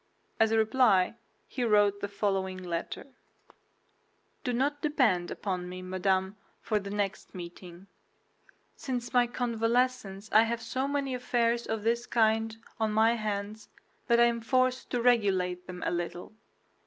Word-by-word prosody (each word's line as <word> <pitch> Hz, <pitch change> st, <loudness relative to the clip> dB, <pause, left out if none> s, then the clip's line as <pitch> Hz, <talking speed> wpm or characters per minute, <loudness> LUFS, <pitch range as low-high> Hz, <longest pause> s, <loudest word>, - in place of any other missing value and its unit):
As 225 Hz, -, +5 dB
a 225 Hz, -, +3 dB
reply, 220 Hz, -4 st, +3 dB, 0.3 s
he 255 Hz, -, -3 dB
wrote 205 Hz, -3 st, +3 dB
the 205 Hz, -, -3 dB
following 195 Hz, -2 st, -1 dB
letter: 175 Hz, -2 st, -5 dB, 1.4 s
Do 250 Hz, -, -1 dB
not 285 Hz, +4 st, 0 dB
depend 235 Hz, -, +2 dB
upon 180 Hz, -3 st, -4 dB
me, 185 Hz, 0 st, -7 dB
madame, 190 Hz, +1 st, 0 dB, 0.2 s
for 215 Hz, -2 st, 0 dB
the 200 Hz, 0 st, -7 dB
next 205 Hz, 0 st, -3 dB
meeting. 175 Hz, 0 st, -9 dB, 0.9 s
Since 250 Hz, -3 st, -4 dB
my 245 Hz, -1 st, +4 dB
convalescence 235 Hz, -3 st, -1 dB
I 215 Hz, -, +7 dB
have 230 Hz, +1 st, 0 dB
so 265 Hz, +1 st, -2 dB
many 280 Hz, -2 st, -1 dB
affairs 240 Hz, -1 st, 0 dB
of 220 Hz, -2 st, -2 dB
this 235 Hz, +1 st, 0 dB
kind 225 Hz, -1 st, +2 dB, 0.2 s
on 220 Hz, -1 st, +1 dB
my 220 Hz, +2 st, +4 dB
hands 210 Hz, -1 st, -4 dB, 0.4 s
that 235 Hz, 0 st, +4 dB
I 235 Hz, -, +7 dB
am 235 Hz, -1 st, 0 dB
forced 255 Hz, +2 st, +1 dB
to 245 Hz, -2 st, -1 dB
regulate 190 Hz, -7 st, +2 dB
them 180 Hz, -1 st, -7 dB
a -, -, 0 dB
little. 175 Hz, +3 st, -4 dB
220 Hz, 145 wpm, -29 LUFS, 190-240 Hz, 1.4 s, I